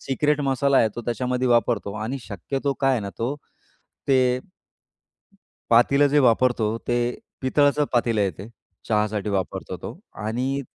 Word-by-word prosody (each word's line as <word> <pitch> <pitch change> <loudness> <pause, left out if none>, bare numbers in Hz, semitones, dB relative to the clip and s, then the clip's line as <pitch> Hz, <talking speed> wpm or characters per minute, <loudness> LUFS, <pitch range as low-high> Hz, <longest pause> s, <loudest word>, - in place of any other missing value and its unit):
Secret 150 +2 0
मसाला 135 0 +2
आहे 110 - +4
तो - - -3
त्याच्यामध्ये 125 +1 -1
वापरतो 115 -4 +1
आणि 130 +5 -3
शक्यतो 135 - -3
काय 135 0 +3
आहे 125 - +1
ना 100 -1 -5
तो, 120 +5 -1 0.7
ते 130 -2 +3 1.3
पातीलं 140 +5 +5
जे 150 - +5
वापरतो, 125 -2 +3 0.2
ते 120 - +1 0.5
पितळाचं 145 +2 +2
पातीलं 115 -3 +1
आहे 95 -2 +1
ते 100 - -8 0.4
चहासाठी 105 -1 0
वापरतो 95 -2 -3
तो. - - -8
आणि 125 +6 -2
125 Hz, 140 wpm, -23 LUFS, 110-135 Hz, 1.3 s, पातीलं